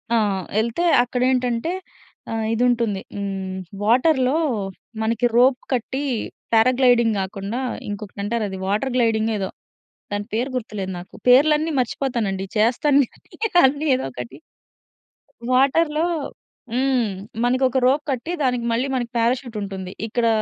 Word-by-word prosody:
ఆ! - - +4 0.4
ఎళ్తే 235 +10 -1 0.2
అక్కడేంటంటే 250 +3 0 0.6
ఆహ్, 225 -1 -1
ఇదుంటుంది. 230 -4 +1
హ్మ్. 195 -2 -4 0.3
వాటర్‌లో 260 +4 +3 0.6
మనకి 230 +2 +1
రోప్ 255 +1 +5
కట్టి, 260 +3 -2 0.5
పారా 225 +3 +5
గ్లైడింగ్ 235 -4 +4
గాకుండా 195 +5 -4 0.3
ఇంకొకటంటారది. 205 0 -3
వాటర్ 220 +6 0
గ్లైడింగ్ 225 -2 +2
ఏదో. 190 -1 -2 0.6
దాని 205 0 -2
పేరు 245 +5 0
గుర్తులేదు 205 -5 -4
నాకు. 175 - -12
పేర్లన్నీ 300 +5 +5
మర్చిపోతానండి. 225 -7 -2
చేస్తాను 270 +6 +4 0.6
అన్నీ 290 +3 -1
ఏదోకటి. 125 - -6 1.2
వాటర్‌లో 300 +4 +3 0.7
హ్మ్. 260 0 +2 0.4
మనకొక 255 +1 +2
రోప్ 280 +3 +3
కట్టి, 265 +6 -3
దానికి 250 -2 0
మళ్లీ 245 +4 0
మనకి 240 -2 -2
పారాచ్యూట్ 240 0 0
ఉంటుంది. 190 -2 -5 0.2
ఇక్కడ 230 +1 0
240 Hz, 110 wpm, -22 LUFS, 210-260 Hz, 1.2 s, రోప్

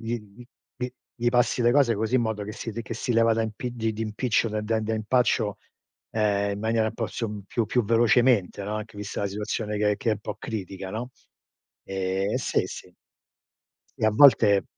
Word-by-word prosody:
gli 115 +1 -2 0.2
gli 120 - -11 0.3
gli 125 0 -3 0.2
gli 120 -2 0
passi 120 0 +2
le 120 - +5
cose 130 -5 +4
così 110 +4 -1
in 120 - +2
modo 110 -2 -2
che 105 - -6
si 115 - -6
che 115 - -6
si 120 +2 -2
leva 115 0 +4
da 115 - +1
impi 110 +3 -4
di 115 -2 -1
di 110 +1 -4
impiccio 110 +1 0
da 110 0 -2
da 110 +1 0
da 110 +1 -1
impaccio, 110 -2 +1 0.5
ehm, 100 -2 +1
in 100 - -4
maniera 110 0 +1
un - - -3
po' 115 - -2
su 105 -3 -4
più 115 +1 -1
più 120 +2 +1
velocemente, 115 -2 +3
no. 105 +1 -3
Anche 105 -1 -7
vista 105 0 -4
la - - +1
situazione 105 +1 -3
che 105 -1 +2
che 115 - -3
è - - +4
un 105 - -4
po' 105 0 -5
critica, 95 -4 -5
no. 120 +4 -5 0.7
Ehm, 95 +1 -1
sì, - - 0
sì. - - -10 1.1
E - - +1
a 110 - +5
volte 110 -5 +6
110 Hz, 205 wpm, -26 LUFS, 105-115 Hz, 1.1 s, volte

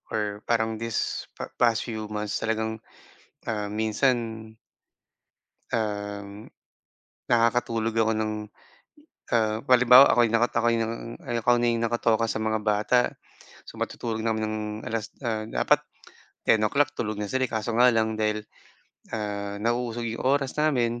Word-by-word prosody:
or 105 -1 -2
parang 110 -1 0
this 115 -1 -2
pa - - -7
past 115 -2 +3
few 110 -3 -5
months 105 0 -3
talagang, 110 0 -2 0.7
ah, 105 -2 -2
minsan 110 0 0 1.2
um, 105 -1 -4 0.8
nakakatulog 115 -1 +2
ako 110 0 +3
ng, 110 0 -1 1.0
ah, 110 -2 +2
halimbawa 125 +1 +8
ako'y 120 -1 +4
nakatokay 115 0 +2
ng 115 +1 -4
ako 120 +1 +2
na 120 0 +2
yung 115 - -1
nakatoka 115 -1 +1
sa - - -1
mga 110 0 0
bata, 105 +3 +2 0.7
so - - -10
matutulog 110 -2 -3
na 115 - +1
kami 110 - -2
ng 110 0 -3 0.3
alas 115 -1 -3 0.2
ah, 110 -1 -1
dapat - - +2 0.6
10:00 135 +7 +3
tulog 110 -2 -2
na 105 - -3
sila 130 0 +1
eh, - - -15
kaso 110 +1 -2
nga 125 +1 +7
lang 110 -1 0
dahil, 105 0 0 0.7
ah, 100 -1 -4
nauusog 120 +1 -1
'yong 115 0 -4
oras 135 0 +1
namin, 120 -6 +1
110 Hz, 135 wpm, -26 LUFS, 110-120 Hz, 1.2 s, halimbawa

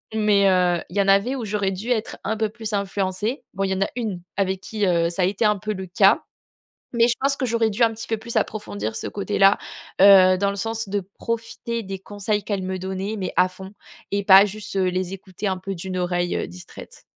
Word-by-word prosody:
Mais 210 -2 +3
heu, 180 -2 +2
il 190 - -7
y - - +5
en 195 - 0
avait 200 +7 +3
où 250 - -4
j'aurais 200 -2 -1
dû 200 +6 -6
être 225 -3 -2
un 220 - -2
peu 220 -1 0
plus 220 0 -7
influencée. 200 +4 -2
Bon, 195 - -1
il 195 - 0
y - - +2
en 190 - -3
a 195 - +1
une 210 -7 -3 0.2
avec 190 -1 0
qui, 210 0 -2
heu, 170 -2 +2
ça 180 +1 -1
a - - +5
été 195 +4 -1
un 210 -1 +3
peu 215 +2 -3
le 190 -1 -6
cas, 175 - +4 0.7
mais 235 0 +4
je 235 - +2
pense 275 +1 +2
que 260 - -1
j'aurais 230 -1 +1
dû 220 +4 -1
un 225 - +2
petit 225 - -8
peu 225 - -1
plus 235 +2 -7
approfondir 110 - -2
ce - - -4
côté-là, 200 -1 +3 0.5
heu, 185 -2 +8
dans 200 +1 +1
le 200 - -5
sens 225 +1 -3
de 200 +1 -1 0.2
profiter 230 0 -4
des 195 -1 -6
conseils 205 +1 -3
qu'elle 200 -3 -2
me 185 0 -3
donnait, 190 +3 -4
mais 185 - -3
à 185 0 +5
fond 190 +1 -11 0.4
et 200 0 +1
pas 195 0 +8
juste, 205 0 -7
heu, 190 - +2
les 185 +1 -2
écouter 195 +1 -7
un 190 - -1
peu 195 +1 -5
d'une 185 +1 -5
oreille, 175 0 -1
heu, - - -2
distraite. 90 +1 -12
195 Hz, 240 wpm, -23 LUFS, 185-215 Hz, 0.7 s, heu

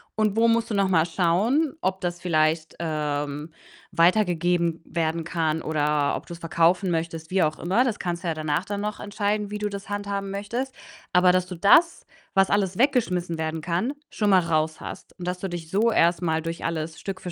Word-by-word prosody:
und 215 -1 +1
wo 230 +1 +5
musst 230 0 +2
du - - -2
noch 195 -1 +3
mal 165 -4 +3
schauen, 200 - +1
ob 190 0 -1
das 175 -1 -3
vielleicht, 160 -2 +1
ähm, 150 -2 -2 0.4
weitergegeben 175 -2 +2
werden 165 0 -2
kann 160 -2 -1
oder 150 -1 +1
ob - - -7
du's 170 - -7
verkaufen 170 +3 +2
möchtest, 165 -1 -3
wie 190 0 +2
auch 155 0 -1
immer. 190 +8 +2
Das 240 -5 -2
kannst 175 0 -3
du - - -3
ja - - 0
danach 155 +1 -1
dann 200 +1 -4
noch 210 +1 -4
entscheiden, 205 0 -2
wie 210 - -3
du 210 0 -2
das 200 -1 -7
handhaben 200 -1 -3
möchtest. 235 +7 -3 0.4
Aber 180 0 +5
dass 185 0 +2
du 180 - -6
das, 260 - +4 0.3
was 195 0 +4
alles 195 -2 +1
weggeschmissen 185 - +1
werden 160 0 -2
kann, 175 - -1 0.2
schon 210 -2 0
mal 190 -2 +6
raus 160 -2 0
hast - - -9
und 175 - -6
dass 180 0 -2
du 195 - -4
dich 170 -2 -6
so 215 +6 +2
erst 170 -3 +3
mal 160 -2 0
durch 165 +1 -5
alles 160 -1 -3
Stück 195 -1 -5
für 180 - -6
175 Hz, 205 wpm, -25 LUFS, 160-200 Hz, 0.4 s, mal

